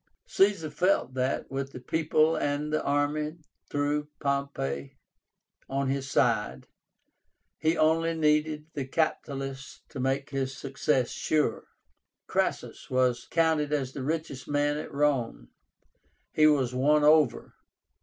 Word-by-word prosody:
Caesar 195 -6 +2
felt 180 -5 +1
that, 130 0 -2
with 135 0 -4
the - - -7
people 155 +3 +2
and 145 +1 -1
the 155 - +1
army 145 +2 0 0.4
through 145 +1 -1
Pompey 140 - -2 0.7
on 135 0 -1
his 135 0 -2
side, 65 - +1 0.9
he 160 +2 +1
only 165 +1 +2
needed 150 -1 +1
the 140 - -3
capitalists 135 -2 -3
to 140 - -8
make 135 +2 -1
his 135 -1 -2
success 135 -2 0
sure. 150 -7 0 0.6
CRASSUS - - -2
was 130 -2 +1
counted 160 -3 +2
as 135 -3 -1
the 135 - -5
richest 150 -2 -3
man 145 0 +1
at 150 - -6
Rome. 140 - 0 0.8
He 155 0 +5
was 135 -5 +2
won 150 +4 +3
over. 150 -4 +3
145 Hz, 125 wpm, -28 LUFS, 135-155 Hz, 0.9 s, He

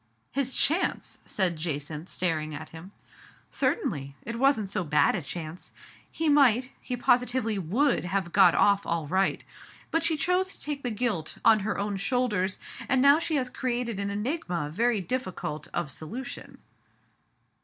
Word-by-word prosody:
" 115 +1 -44
His 265 -1 +2
chance! 335 +6 +1
" - - -34
said 180 -4 +1
Jacynth, 155 +1 -4
staring 155 -4 -1
at 155 +1 -8
him. 165 +4 -11 0.6
"Certainly; 140 - -1
it 230 +1 -5
wasn't 270 -6 +3
so 190 - -1
bad 150 -2 +3
a 195 - -2
chance. 160 +3 -7 0.4
He 325 - -2
might, 265 -4 +4
he 250 - -4
positively 245 -3 +2
would 215 - +1
have 180 -1 -1
got 185 -3 +6
off 200 -1 +4
all 165 -2 -2
right. 190 +5 0 0.5
But 330 0 +1
she 330 -1 +1
chose 365 +5 +1
to - - -21
take 290 -1 -4
the 245 - -2
guilt 215 -8 -2
on 220 -1 +7
her 205 +1 -2
own 200 0 -2
shoulders, 210 -4 0 0.3
and 260 - +3
now 280 +3 +6
she 330 -1 -1
has 260 -3 +1
created 245 -4 -2
an 200 0 -2
enigma 200 - -2
very 230 +2 +1
difficult 185 - -4
of 170 -5 -2
solution." 225 - -7
205 Hz, 165 wpm, -27 LUFS, 170-255 Hz, 0.6 s, on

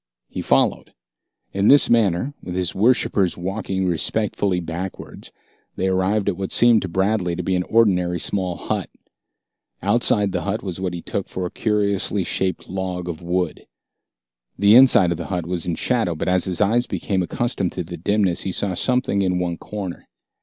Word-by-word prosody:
He - - -5
followed. - - +1 0.6
In 100 +1 +1
this 145 +1 +6
manner, 115 +2 +2
with 90 - -6
his 90 -2 0
worshippers 100 -4 +2
walking 95 +1 -3
respectfully 95 +2 0
backwards, 90 +2 -7 0.4
they 95 - 0
arrived 95 +2 0
at - - 0
what 95 -1 -4
seemed 120 -2 +5
to - - -4
Bradley 95 0 0
to - - -4
be 95 - -1
an 90 - +1
ordinary 90 -4 +2
small 90 0 -1
hut. - - -3 0.9
Outside 105 -1 +2
the 90 -1 -2
hut 100 +6 -3
was 95 -3 -5
what 90 -2 -3
he 85 - -7
took 100 - -4
for 95 - -4
a 90 - -5
curiously 100 -2 0
shaped 95 0 -2
log 90 -1 -4
of 85 -2 -5
wood. 90 -1 -2 0.9
The 100 +1 +5
inside 120 -8 +7
of 85 - -1
the 85 - -6
hut 90 -4 -3
was 90 -1 -3
in 85 - -1
shadow, 115 -8 0
but 80 - -4
as 90 -1 +2
his 90 0 -2
eyes 115 +4 +2
became 95 -2 -2
accustomed 100 0 -2
to 90 - -3
the 85 +1 -8
dimness, 95 +1 +1
he 95 - -2
saw 95 +1 -1
something 125 0 +1
in 90 -2 +1
one 90 -1 -2
corner. 100 -4 -7
95 Hz, 180 wpm, -21 LUFS, 90-105 Hz, 0.9 s, inside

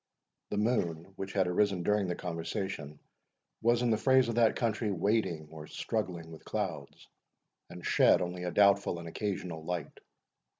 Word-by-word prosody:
The 105 - -2
moon, 95 -6 0
which 95 0 -6
had 95 -2 +3
arisen 90 0 +1
during 105 0 +2
their 90 - -1
conversation, 85 -3 -4 0.6
was, 120 +1 +3
in 120 - +2
the 110 - +3
phrase 130 0 +4
of - - 0
that 115 -1 +4
country, 115 -2 0
wading 90 -4 0
or 80 -1 -9
struggling 90 -7 -3
with 80 - -11
clouds, - - -4 0.6
and 90 -1 -9
shed - - +5
only 90 0 -3
a 90 - -1
doubtful 100 -1 +4
and 85 0 -7
occasional 90 -3 -4
light. 85 -2 -4
95 Hz, 160 wpm, -31 LUFS, 85-105 Hz, 0.6 s, shed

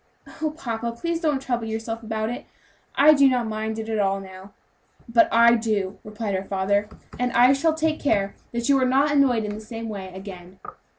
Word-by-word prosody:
"Oh, 315 - +1
papa, 235 -6 -4
please 335 -1 -2
don't 300 -5 +1
trouble 240 -4 -3
yourself 225 +1 -4
about 220 0 -3
it. 245 - -7 0.5
I 300 +2 +7
do 280 -2 +5
not 250 -2 0
mind 220 0 -3
it 220 0 -5
at 220 -1 -1
all, 195 -1 +1
now." 190 0 -11 0.6
"But 230 0 +3
I 235 +1 +6
do," 215 -4 -1
replied 210 -1 -4
her 190 0 -1
father, 200 +2 0 0.3
"and 250 0 0
I 250 +2 +6
shall 315 +3 +1
take 320 0 0
care 200 -7 0 0.2
that 235 0 -2
you 280 -1 +4
are - - +3
not 275 +3 +3
annoyed 265 -6 +3
in 210 0 -4
the 215 - -7
same 225 +1 -7
way 195 -3 -6
again." 190 -1 -10
225 Hz, 200 wpm, -24 LUFS, 205-260 Hz, 0.6 s, I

